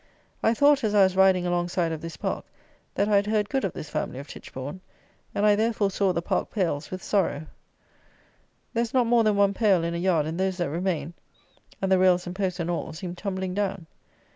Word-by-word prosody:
I 225 - +3
thought, 285 +1 +4
as 210 -1 +1
I 200 - +7
was 190 -1 +2
riding 190 -2 +4
alongside 175 -1 0
of 160 - -4
this 165 0 -7
park, - - -3 0.5
that 200 - +1
I 210 -1 +4
had 200 +1 +1
heard 210 -1 +1
good 270 +3 0
of 195 - -1
this 150 - -8
family - - -3
of 140 +2 -8
Titchbourne, 145 +8 -8 0.5
and, 205 - +1
I 210 -1 +6
therefore 215 -2 +1
saw 195 0 +1
the 170 -1 -2
park - - -1
pales 170 -9 -2
with 185 0 -6
sorrow. 165 -7 0 1.3
There 230 - +1
is 235 +1 -3
not 250 -2 +4
more 235 0 +4
than 215 -1 +2
one 200 0 +3
pale 195 -5 +3
in 170 0 -2
a - - -2
yard, 170 -4 +2
and 160 +3 -4
those 190 -1 0
that 175 -6 -1
remain, 170 -2 -2 0.7
and 190 - +1
the 190 - +5
rails 185 -1 +4
and 180 0 -6
posts 190 -2 -2
and 170 - -2
all, 170 - -3
seem 175 +2 -6
tumbling 190 0 -4
down. 195 -3 -2
190 Hz, 220 wpm, -26 LUFS, 175-205 Hz, 1.3 s, I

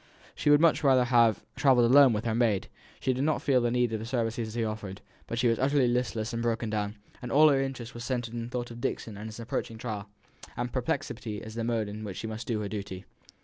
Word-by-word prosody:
She - - 0
would 145 0 +7
much 165 -1 +3
rather 130 -3 +5
have 120 -4 +3
travelled 130 -4 +4
alone 140 -1 +8
with 110 +1 -2
her 115 - 0
maid; 110 -4 +1 0.3
she 130 - +1
did 130 +2 -1
not 155 +1 +1
feel 130 -3 +3
the 120 - +1
need 120 -1 +1
of 110 - -1
the 110 - -6
services 115 -2 -2
he 115 -1 0
offered; 105 -3 -5 0.3
but 115 - -4
she 120 +1 +2
was 115 -1 +2
utterly 135 -1 +3
listless 120 -1 -1
and 115 - -2
broken 115 -1 -1
down; 105 -1 -2 0.3
all 150 +4 +6
her 135 -2 +3
interest 125 -3 -5
was 120 - -7
centred 120 -3 -3
in 120 - -3
the - - -8
thought 120 -1 -4
of 120 0 -9
Dixon 110 -2 -3
and 105 +2 -7
his 110 +1 -9
approaching 115 0 -4
trial, 105 -3 -5 0.5
and 120 0 -3
perplexity 115 -3 -3
as 110 - -8
to - - -10
the 115 - -1
mode 115 -3 0
in 105 +1 -7
which 100 -3 -6
she - - -5
must 110 +1 -6
do 115 -3 -1
her 105 - -3
duty. 100 -2 -6
115 Hz, 250 wpm, -28 LUFS, 110-125 Hz, 0.5 s, alone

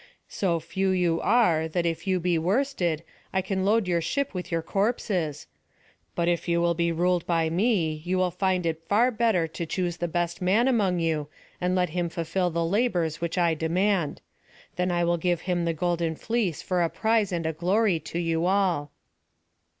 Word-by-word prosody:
So 175 -4 0
few 190 +4 -2
you 175 -3 +1
are, 175 -9 +3
that 170 +2 -1
if 165 +3 -2
you 185 -1 +2
be 175 -1 +1
worsted, 180 - 0 0.3
I 190 0 0
can 190 0 -2
load 210 0 +2
your 170 -1 +1
ship 280 - -1
with 180 -1 -5
your 165 -1 0
corpses. 195 - -1 0.7
But 170 - 0
if 175 0 0
you 170 0 +2
will 170 0 +2
be 170 0 0
ruled 175 +1 +1
by 165 -2 +1
me, 170 -5 +1
you 180 +2 -1
will 185 -1 +1
find 185 0 0
it 165 0 -3
better 235 +5 +4
far 215 -8 +2
to 165 +1 -5
choose 175 0 -2
the 175 - -2
best 175 +1 -2
man 205 +7 +3
among 205 -8 +2
you, 160 -3 -1 0.3
and 180 +1 +1
let 180 -2 +1
him 175 +1 -2
fulfil 175 +2 -1
the 170 0 -1
labours 175 -5 0
which 170 +1 -2
I 170 -2 +3
demand. 170 +1 0 0.5
Then 180 +1 0
I 175 -1 +1
will 170 0 +2
give 175 0 0
him 175 -2 -1
the 165 - +1
golden 170 -1 -1
fleece 220 -5 -2
for 180 -1 0
a 170 - +2
prize 220 -1 +1
and 170 -2 -2
a 160 - 0
glory 185 +3 +1
to 160 +2 -6
you 165 0 0
all." 185 -7 +1
175 Hz, 195 wpm, -26 LUFS, 165-190 Hz, 0.7 s, better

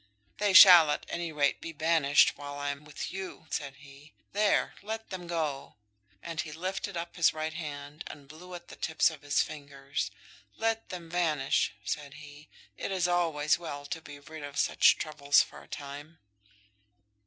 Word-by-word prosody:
"They 205 -2 +2
shall, 180 -5 +10
at - - -1
any 170 -1 -3
rate, 145 -2 +1
be 165 - -6
banished 155 -2 +4
while 145 0 -8
I 145 0 -2
am 140 +1 -9
with 150 - -6
you," 190 -3 -7
said 140 -3 -3
he. 140 +2 -16 0.2
"There; 205 0 +2
let 220 +2 -6
them 180 -2 -6
go!" 155 -5 -3 0.5
And 165 -1 -3
he 155 - -8
lifted 185 +3 -4
up 170 0 -5
his 170 - +4
right 155 0 -3
hand, 150 -1 -7
and 145 -2 -11
blew 175 +5 -11
at 175 0 -11
the - - -10
tips 160 +1 +2
of 155 -3 -11
his 145 -1 +2
fingers. 140 -7 -5 0.5
"Let 225 0 -1
them 175 -2 -7
vanish," 155 -6 +1
said 145 -2 -4
he. 150 0 -13 0.3
"It - - -4
is 185 -2 +1
always 165 -4 +1
well 145 -4 -6
to 160 +3 -5
be 145 -2 -11
rid 155 +2 -10
of 145 0 -8
such - - +4
troubles 145 -2 +3
for - - -13
a - - -17
time." 145 +3 -8
155 Hz, 175 wpm, -29 LUFS, 145-175 Hz, 0.5 s, shall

